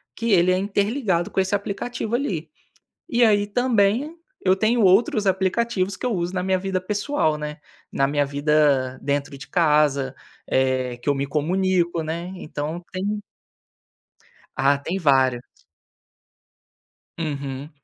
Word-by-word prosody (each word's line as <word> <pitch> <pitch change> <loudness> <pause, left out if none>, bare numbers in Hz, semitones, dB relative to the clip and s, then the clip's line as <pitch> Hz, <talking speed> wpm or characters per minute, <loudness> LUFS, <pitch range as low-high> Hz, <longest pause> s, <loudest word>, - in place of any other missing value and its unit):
que 230 -1 -1
ele 180 -1 +5
é 185 - +2
interligado 200 -1 0
com - - -2
esse 190 +1 0
aplicativo 210 +3 -2
ali. 180 - -2 0.6
E 240 0 +3
aí, 205 -2 +3
também, 240 +5 +1 0.3
eu 185 0 +5
tenho 220 +4 +2
outros 205 +2 +4
aplicativos 190 +1 0
que - - -8
eu 250 - +1
uso 175 0 -2
na 180 - -1
minha 190 0 +1
vida 190 0 -1
pessoal, 205 - 0
né, 150 0 -5 0.3
na 135 - +1
minha 145 0 +1
vida 140 -2 +2
dentro 140 0 -2
de 135 - -11
casa, 150 -6 +2 0.3
eh, 130 -2 0
que 120 - -7
eu 145 - +4
me 140 0 -2
comunico, 175 +3 0
né, 170 +3 -4
então 155 +1 -5
tem 205 +3 -2 1.4
Ah, 140 +1 +3
tem 170 +7 -3
vários. 130 -6 +3 1.8
Uhum, 140 -2 -4
180 Hz, 140 wpm, -23 LUFS, 145-200 Hz, 1.8 s, ele